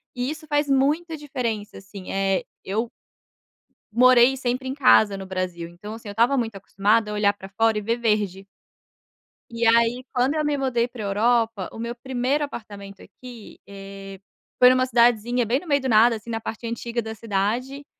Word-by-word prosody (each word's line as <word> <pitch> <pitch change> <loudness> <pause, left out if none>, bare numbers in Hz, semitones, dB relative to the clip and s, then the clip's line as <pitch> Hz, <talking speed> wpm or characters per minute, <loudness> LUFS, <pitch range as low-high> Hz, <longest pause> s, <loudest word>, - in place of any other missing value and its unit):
e 250 +2 -2
isso 310 0 -7
faz 290 -1 0
muita 305 +5 +1
diferença, 240 -8 -4
assim. 195 -1 -10
Eh, 195 -1 0 0.2
eu 220 +4 -2 1.0
morei 250 +2 +5
sempre 255 +1 -2
em 260 - -2
casa 220 -7 +4
no 190 - -7
Brasil. 185 -3 -4
Então, 205 +5 -10
assim, 225 -1 -10
eu - - -5
estava 240 +5 +2
muito 225 -4 -2
acostumada 210 +3 0
a - - -4
olhar 205 -1 +2
pra 195 -1 -12
fora 225 +2 +1
e - - -2
ver 230 +3 -1
verde. 210 -4 -1 1.1
E, 230 0 -2
aí, 235 +2 +3
quando 260 +4 +1
eu 305 - 0
me 295 -1 0
mudei 245 -3 0
para 240 -4 -8
Europa, 220 0 +1
o - - -10
meu 235 +1 -4
1º 260 +4 -1
apartamento 200 -7 -8
aqui, 245 -4 -13
eh, 195 -1 -10 0.4
foi 250 - +8
numa 255 0 +3
cidadezinha 240 0 +2
bem 250 +5 +1
no 355 - -14
meio 285 -2 +2
do 265 - -2
nada, 230 +1 +5
assim, 220 +2 -10
na 225 - -2
parte 225 +2 -6
antiga 235 +1 -3
da 220 0 -6
cidade. 230 +7 -2
230 Hz, 185 wpm, -23 LUFS, 205-255 Hz, 1.1 s, foi